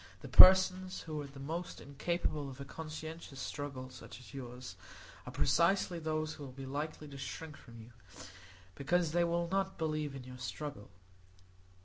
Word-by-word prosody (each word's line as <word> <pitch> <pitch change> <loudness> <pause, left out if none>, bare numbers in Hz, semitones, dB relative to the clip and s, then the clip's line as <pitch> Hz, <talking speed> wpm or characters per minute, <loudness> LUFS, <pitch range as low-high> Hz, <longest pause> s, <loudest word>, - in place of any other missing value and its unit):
The - - -7
persons 185 0 +8
who 155 -2 -4
are 145 - -6
the 135 0 -12
most 165 +6 -4
incapable 145 0 -2
of 130 0 -10
a 140 - -6
conscientious 155 -1 -7
struggle 135 -3 -5
such 125 - -10
as 125 - -14
yours 125 -1 -7 0.5
are - - -5
precisely 170 - +3
those 155 -1 -1
who 150 - -9
will 135 - -7
be 135 +1 -8
likely 150 +3 -4
to 140 -1 -9
shrink 155 +3 -6
from 115 -3 -13
you, 115 +2 -12 0.8
because 165 - +1
they 175 +1 +3
will 170 0 +1
not 195 +1 0
believe 155 -3 -1
in 135 - -7
your 125 0 -10
struggle. 125 -3 -5
150 Hz, 165 wpm, -34 LUFS, 135-170 Hz, 0.8 s, persons